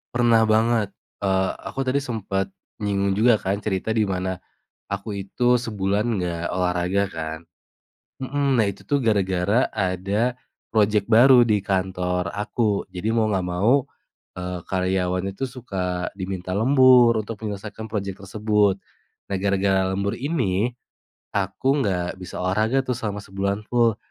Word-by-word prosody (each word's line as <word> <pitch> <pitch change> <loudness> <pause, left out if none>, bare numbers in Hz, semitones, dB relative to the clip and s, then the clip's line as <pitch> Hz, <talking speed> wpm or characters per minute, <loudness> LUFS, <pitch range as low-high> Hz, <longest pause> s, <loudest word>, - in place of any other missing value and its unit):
Pernah 120 -2 +4
banget, 110 -1 +2 0.3
eee, 95 -1 +2
aku 135 -1 -4
tadi 140 +2 +1
sempet 100 -6 -2 0.3
nyinggung 100 -1 +1
juga 110 +1 +4
kan 100 +2 -2
cerita 105 +2 -1
di 110 - +3
mana 95 -2 -2 0.5
aku 100 +1 -4
itu 120 +6 +1
sebulan 105 -2 -1 0.2
nggak 85 -2 -3
olahraga 90 +1 +1
kan. 80 -1 -5 0.8
Mhm, 135 0 0
nah 110 - +4
itu 100 - -4
tuh 145 - 0
gara-gara 100 -1 +1
ada 100 +4 0 0.4
project 105 -2 +3
baru 120 +2 +7
di 105 -3 +2
kantor 90 -1 -1
aku, 105 -1 -1
jadi 95 +5 -2
mau 110 -2 +2
nggak 95 -3 0
mau, 110 +10 +2 0.5
eee, 90 -1 -5
karyawan 95 0 0
itu 100 +7 -4
suka 95 -8 -3
diminta 95 -1 -3
lembur 125 -1 +6
untuk 110 +1 -7
menyelesaikan 105 +1 -6
project 100 -3 -4
tersebut. 105 -1 +1 0.5
Nah, 100 - -1
gara-gara 95 0 +1
lembur 100 +3 -1
ini 120 - 0 0.6
aku 100 +9 0
nggak 90 -4 -2
bisa 90 - -7
olahraga 110 +8 +1
tuh 125 - 0
selama 110 -4 -4
sebulan 100 +2 -2
full. 115 -2 +2
100 Hz, 135 wpm, -23 LUFS, 95-115 Hz, 0.8 s, baru